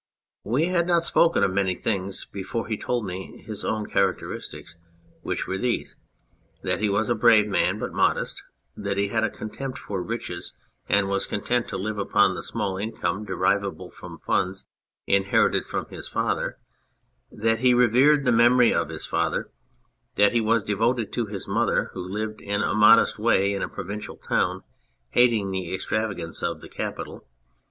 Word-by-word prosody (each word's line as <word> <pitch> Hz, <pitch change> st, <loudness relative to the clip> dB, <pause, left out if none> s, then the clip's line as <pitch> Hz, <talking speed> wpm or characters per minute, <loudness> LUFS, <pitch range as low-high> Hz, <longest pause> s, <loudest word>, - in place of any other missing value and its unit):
We 135 Hz, -, +1 dB
had 170 Hz, -2 st, +1 dB
not 170 Hz, -1 st, +3 dB
spoken 170 Hz, 0 st, +3 dB
of 95 Hz, -, +2 dB
many 95 Hz, -2 st, +1 dB
things 100 Hz, -2 st, -2 dB
before 100 Hz, +4 st, -4 dB
he 110 Hz, -, -1 dB
told 120 Hz, +1 st, -2 dB
me 95 Hz, +5 st, -7 dB
his 110 Hz, -2 st, -6 dB
own 110 Hz, -1 st, -1 dB
characteristics, 95 Hz, -4 st, -2 dB, 0.5 s
which -, -, -3 dB
were 95 Hz, -, -3 dB
these: 125 Hz, +1 st, -2 dB, 0.7 s
that -, -, -1 dB
he 105 Hz, 0 st, +1 dB
was 100 Hz, +2 st, +1 dB
a 120 Hz, -, +2 dB
brave 110 Hz, -1 st, +5 dB
man 100 Hz, -, +1 dB
but -, -, -5 dB
modest; -, -, +1 dB, 0.3 s
that 100 Hz, -1 st, -3 dB
he 100 Hz, 0 st, +1 dB
had 110 Hz, +1 st, 0 dB
a -, -, +2 dB
con 110 Hz, -, -8 dB
tempt 135 Hz, -2 st, -5 dB
for 95 Hz, -3 st, -4 dB
riches, 90 Hz, -3 st, -5 dB, 0.3 s
and 100 Hz, -1 st, +3 dB
was 100 Hz, 0 st, +1 dB
content 120 Hz, +4 st, -1 dB
to -, -, -4 dB
live 105 Hz, +2 st, -3 dB
upon 100 Hz, -1 st, +3 dB
the -, -, -5 dB
small 100 Hz, -4 st, -3 dB
income 105 Hz, -1 st, -2 dB
derivable 95 Hz, -, -1 dB
from -, -, -10 dB
funds 95 Hz, +1 st, -1 dB, 0.4 s
inherited 100 Hz, 0 st, +2 dB
from -, -, -3 dB
his -, -, -8 dB
father; -, -, -1 dB, 0.7 s
that 115 Hz, +1 st, 0 dB
he 125 Hz, 0 st, +4 dB
revered 130 Hz, +5 st, +4 dB
the 125 Hz, -, +4 dB
memory 120 Hz, +1 st, +5 dB
of -, -, 0 dB
his -, -, -6 dB
father; -, -, -1 dB, 0.6 s
that 100 Hz, 0 st, +5 dB
he 120 Hz, -, +2 dB
was 115 Hz, 0 st, +2 dB
devoted 115 Hz, +2 st, 0 dB
to 120 Hz, -3 st, -1 dB
his 100 Hz, -2 st, -5 dB
mother, -, -, +1 dB
\vho 90 Hz, 0 st, -6 dB
lived 110 Hz, +2 st, -4 dB
in 100 Hz, +1 st, -1 dB
a -, -, 0 dB
modest 105 Hz, +1 st, +5 dB
way 100 Hz, -3 st, +3 dB
in 100 Hz, -, -3 dB
a -, -, -2 dB
provincial 105 Hz, +3 st, -6 dB
town, 90 Hz, +1 st, -1 dB, 0.5 s
hating 115 Hz, -5 st, +3 dB
the 95 Hz, -2 st, -3 dB
extravagance 95 Hz, -3 st, -2 dB
of -, -, -2 dB
the -, -, -11 dB
capital. -, -, -6 dB
105 Hz, 175 wpm, -25 LUFS, 100-115 Hz, 0.7 s, brave